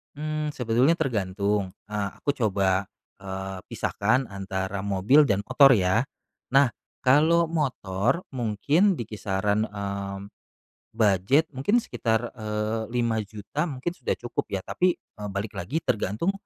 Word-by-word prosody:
Mmm, 155 0 -3
sebetulnya 125 +5 +3
tergantung, 100 - -1 0.2
eee, 105 -2 -2
aku 145 -1 0
coba, 100 -4 +1 0.3
eee, 95 0 -6
pisahkan 120 +6 0
antara 95 0 -4
mobil 100 +10 +4
dan 100 -5 +1
motor 130 +4 +6
ya. 100 +3 +2 0.5
Nah, 135 -1 +6 0.3
kalau 160 +5 +4
motor 130 - 0
mungkin 135 - +2
di 120 - -6
kisaran, 105 0 0
eee, 100 -1 -5 0.8
budget 110 - +3
mungkin 205 - +1
sekitar, 115 +1 -1
eee, 110 +1 -2
Rp5.000.000 115 - -2
mungkin 140 +3 -3
sudah 140 -8 -2
cukup 120 - -4
ya, 95 - -2
tapi, 180 +8 +1
eee, 105 -1 -10
balik 100 +2 -4
lagi 140 - -3
tergantung 110 - 0
110 Hz, 125 wpm, -26 LUFS, 100-140 Hz, 0.8 s, motor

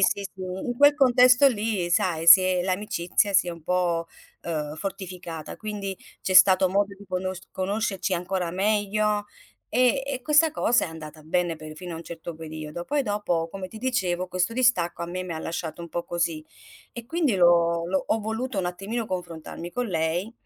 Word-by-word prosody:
sì, 200 - +2
sì, 190 -1 -8
in 190 +6 -4
quel 285 0 +7
contesto 255 -1 +6
lì 210 -6 -2
sai, 170 -2 +1
si 185 - +11
è 185 -1 +1
l'amicizia 190 0 0
si 185 -2 +3
è - - -1
un 165 -2 -10
po' 175 -2 0 0.4
uhm, 155 -2 -3
fortificata, 180 -3 -6
quindi 205 -3 -5 0.2
c'è 185 - -1
stato 185 +1 +7
modo 200 +1 0
di 205 - -14
conosc 185 -1 -4
conoscerci 195 0 -1
ancora 180 -1 -2
meglio 210 +1 +1 0.4
e 255 +3 +3
e 270 -2 -4
questa 300 +3 +4
cosa 240 -5 +2
è - - -5
andata 155 -1 -10
bene 175 +1 0
per 155 0 -10
fino 175 +2 -7
a - - -6
un 165 - -9
certo 170 0 -8
periodo. 155 +1 -7
Poi 290 +5 0
dopo, 205 -7 -1
come 195 0 -6
ti 220 +4 -11
dicevo, 185 -8 -1
questo 185 +4 -1
distacco 225 -9 +1
a - - -3
me 185 +1 -4
mi 180 - -5
ha 160 - -5
lasciato 165 -1 -5
un 170 - -8
po' 170 +1 -4
così. 165 -2 -2 0.5
E 235 -1 -8
quindi 305 -3 0
l'ho 170 -2 +3
l'ho 190 +1 0
ho 225 - +1
voluto 220 +2 -3
un 185 - 0
attimino 200 +6 -3
confrontarmi 175 -2 -6
con 245 0 -2
lei. 170 +4 -1
185 Hz, 190 wpm, -25 LUFS, 170-215 Hz, 0.5 s, si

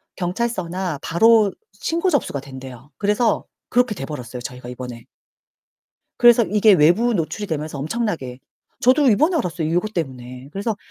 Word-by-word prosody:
경찰서나 185 -3 -2
바로 215 +3 +4 0.2
신고 340 +3 -1
접수가 140 - 0
된대요. 130 -1 -11
그래서 210 +2 +1 0.2
그렇게 245 -2 +2
돼버렸어요, 130 -4 -6
저희가 125 0 -8
이번에. 125 -2 -8 1.1
그래서 240 -1 +7
이게 210 +1 +4
외부 190 +9 +4
노출이 205 +4 -2
되면서 155 -3 -4
엄청나게 160 - -3 0.4
저도 260 +3 +4
이번에 310 - +3
알았어요 170 - -2
이것 180 +6 0
때문에. 130 -4 -5
그래서 205 +2 -2
180 Hz, 360 characters per minute, -21 LUFS, 135-225 Hz, 1.1 s, 그래서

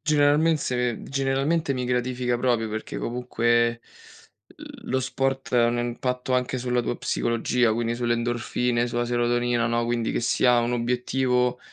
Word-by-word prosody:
generalmente- 145 -5 +2
generalmente 135 +3 0
mi 125 -1 -2
gratifica 125 0 -1
proprio 120 -3 +1
perché 110 +1 -5
comunque 120 -1 0 1.0
lo 130 - 0
sport 135 0 -2
ha 120 -1 +5
un 120 0 0
impatto 125 +2 -2
anche 125 0 0
sulla 125 0 0
tua 120 0 -3
psicologia, 120 0 0
quindi 115 +1 -1
sulle 120 -1 0
endorfine, 120 0 0
sulla 120 0 -1
serotonina, 120 0 +1
no, 120 0 0
quindi 115 -1 -1
che - - -1
sia 120 +1 +3
un 120 +1 -1
obiettivo, 125 +1 0
120 Hz, 140 wpm, -25 LUFS, 120-130 Hz, 1.0 s, ha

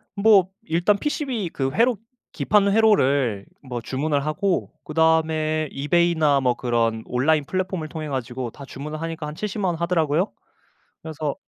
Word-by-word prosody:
뭐 200 -3 +5
일단 175 +5 +2
PCB 260 - -2
그 135 -3 -2
회로 235 -1 +2 0.4
기판 205 -1 +2
회로를 140 - +3 0.2
뭐 125 -3 -5
주문을 140 +3 -1
하고 185 +4 -1
그 155 - -8
다음에 155 -1 +2
eBay나 155 -1 +2
뭐 125 -2 +2
그런 115 -2 0
온라인 145 +4 +1
플랫폼을 185 -3 -3
통해 155 -2 -6
가지고 125 -2 -4
다 140 - -11
주문을 150 +4 -7
하니까 165 -2 -4
한 150 +1 -6
70 210 +2 -4
만 190 - +1
원 - - -4
하더라고요. 170 +1 +1 0.7
그래서 155 -2 -4
155 Hz, 325 characters per minute, -23 LUFS, 140-185 Hz, 0.7 s, 뭐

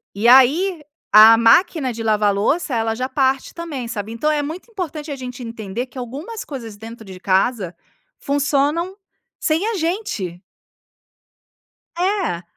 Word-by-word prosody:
E 220 +4 +1
aí, 300 +8 +5 0.3
a 220 +1 +9
máquina 260 +3 +3
de 225 - -7
lavar 215 -1 +2
a - - +3
louça, 255 - 0
ela 225 0 0
já 255 +2 -2
parte 270 -1 0
também, 300 -8 -6
sabe? 220 -2 -5
Então 300 +7 0
é 295 -1 0
muito 325 +10 -7
importante 315 -6 -5
a - - -3
gente 250 -1 -8
entender 230 +1 -5
que 260 - -16
algumas 285 - -6
coisas 230 -7 -8
dentro 225 +1 -10
de 185 -1 -10
casa, 190 -1 0 0.4
funcionam 290 +6 0 0.4
sem 325 +6 0
a 455 - -1
gente. 320 - -3 1.6
É, 360 - -1
260 Hz, 150 wpm, -20 LUFS, 225-315 Hz, 1.6 s, a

